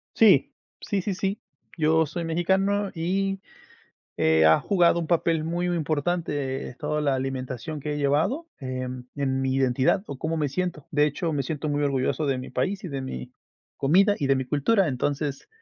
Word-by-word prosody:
Sí. - - +5 0.3
Sí, 200 -4 -2
sí, 195 -1 -2
sí. 195 +2 -2 0.4
Yo 160 0 +3
soy 170 +3 -4
mexicano 190 +5 +1
y, 195 +3 -1 0.8
eh, 80 0 +4
ha 80 - +6
jugado 175 -3 +3
un 170 - -2
papel 165 -1 +1
muy, 175 +2 -1
muy 175 - 0
importante, 150 -3 -1
eh, 125 - -14
toda 150 0 -1
la 140 -2 +2
alimentación 130 +2 -4
que 150 +1 -3
he 145 - -3
llevado, 155 - +1
eh, 130 -1 -4 0.3
en 135 -2 0
mi 130 0 0
identidad 135 +7 +2
o 140 - -7
cómo 160 +1 -2
me 150 -2 +1
siento. 175 -1 -3
De 150 0 +3
hecho, 155 +3 -2
me 140 - 0
siento 150 +3 -3
muy 145 0 0
orgulloso 140 +2 0
de 135 -2 0
mi 130 - -7
país, 190 - -1
y - - -3
de 135 -3 -4
mi 65 - -6 0.4
comida, 195 +9 +4
y 140 - 0
de 135 0 +3
mi 130 - -1
cultura. 170 - +2
Entonces, 140 - -2
150 Hz, 190 wpm, -25 LUFS, 135-175 Hz, 0.8 s, ha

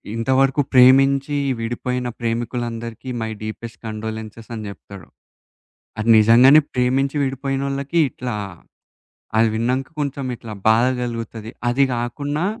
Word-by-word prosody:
"ఇంతవరకు 130 +4 +2
ప్రేమించి 135 +3 +5 0.2
విడిపోయిన 125 +2 -3
ప్రేమికులందరికీ 115 0 -4
మై 110 0 -3
డీపెస్ట్ 115 +2 -7
కండోలెన్సెస్" 110 0 -7
అని 110 - -6
జెప్తాడు. 100 -2 -12 0.9
అది 110 +2 -1
నిజంగానే 120 +7 +7
ప్రేమించి 130 +3 +1
విడిపోయినోళ్ళకి 135 +3 -2
ఇట్లా, 125 -1 -5 1.0
అది 115 +1 +5
విన్నాంక 125 +4 -1
కొంచెం 140 -2 -3
ఇట్లా 115 -2 -9 0.2
బాధ 115 +2 +4 0.2
గలుగుతది. 115 -2 -5 0.2
అది 130 +3 +3
గాకున్నా 145 +7 -2
120 Hz, 105 wpm, -21 LUFS, 115-135 Hz, 1.0 s, నిజంగానే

